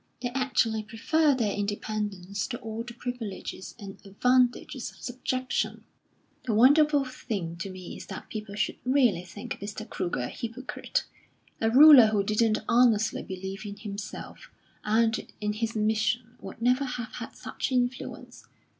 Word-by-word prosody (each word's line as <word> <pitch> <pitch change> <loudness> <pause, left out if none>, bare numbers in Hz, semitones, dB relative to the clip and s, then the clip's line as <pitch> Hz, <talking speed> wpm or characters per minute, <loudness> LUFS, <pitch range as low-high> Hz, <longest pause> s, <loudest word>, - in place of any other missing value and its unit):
"They 245 0 -2
actually 245 -4 +1
prefer 280 +8 +2
their 225 -5 0
independence 205 -1 -3
to 250 -3 -4
all 225 0 -5
the 235 0 -8
privileges 235 -6 -6
and 200 -4 -9
advantages 250 +4 +1
of - - -17
subjection.... 255 +1 -2 0.6
The 225 - 0
wonderful 285 +4 +5
thing 200 -9 -4
to 170 +4 -5
me 185 -1 -8
is - - -10
that 190 - -7
people 210 -2 -6
should - - -1
really 250 -9 +3
think 195 +3 -7
Mr. 210 +2 -6
Kruger 175 - -2
a 120 - -2
hypocrite. 235 +3 -3 0.6
A 225 - +3
ruler 270 -1 +10
who 210 -2 +1
didn't 215 +1 +1
honestly 230 -3 +3
believe 190 +2 -6
in 205 -1 -6
himself 205 -1 -7 0.3
and 225 +1 +1
in 210 0 -1
his 225 +1 -2
mission 220 +2 0
would 195 +4 -8
never 250 +3 +3
have 245 -2 -5
had - - -7
such - - -4
influence. 250 +1 -2
225 Hz, 145 wpm, -28 LUFS, 205-250 Hz, 0.6 s, ruler